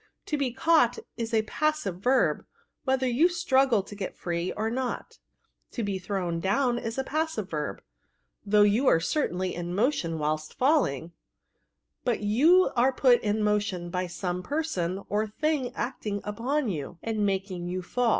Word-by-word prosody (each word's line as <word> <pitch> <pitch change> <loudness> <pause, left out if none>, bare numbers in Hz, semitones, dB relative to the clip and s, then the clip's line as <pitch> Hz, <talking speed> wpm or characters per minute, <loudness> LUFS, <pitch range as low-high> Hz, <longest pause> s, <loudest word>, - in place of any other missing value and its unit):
To 300 - -1
be 275 -4 0
camght 265 -2 +3 0.2
is 230 -1 -4
a 220 -1 +2
passive 290 - -1
verb, 255 +6 +2 0.4
whether 265 -1 +1
you 260 +8 +4
struggle 270 - +2
to 205 - -10
get 200 -2 -5
free 170 +1 -2
or 220 +1 -2
not: 255 +1 -4 0.5
to 235 - -2
be 200 -2 -2
thrown 180 -3 -2
down 240 +7 +1
is 225 +1 -5
a 265 - 0
passive 300 - -2
verb, 150 -2 -3 0.6
though 210 +1 +4
you 215 +6 +3
are 165 - +5
certainly 185 - -1
in 175 +1 -4
motion 200 - +1
whilst 155 0 -2
falling; 250 - +1 0.9
but 240 -3 0
you 295 - +4
axe 255 +2 +2
put 250 -3 +5
in 210 0 0
motion 205 -4 0
by 180 0 -1
some 180 0 -3
person 195 - -2
or 210 +1 0
thing 280 +3 -1
acting 210 -5 -3
upon 245 +7 -1
you, 165 -3 -4
and 220 -2 -1
making 190 -3 -1
you 185 +1 -3
faU." 245 +6 0
215 Hz, 160 wpm, -27 LUFS, 185-260 Hz, 0.9 s, are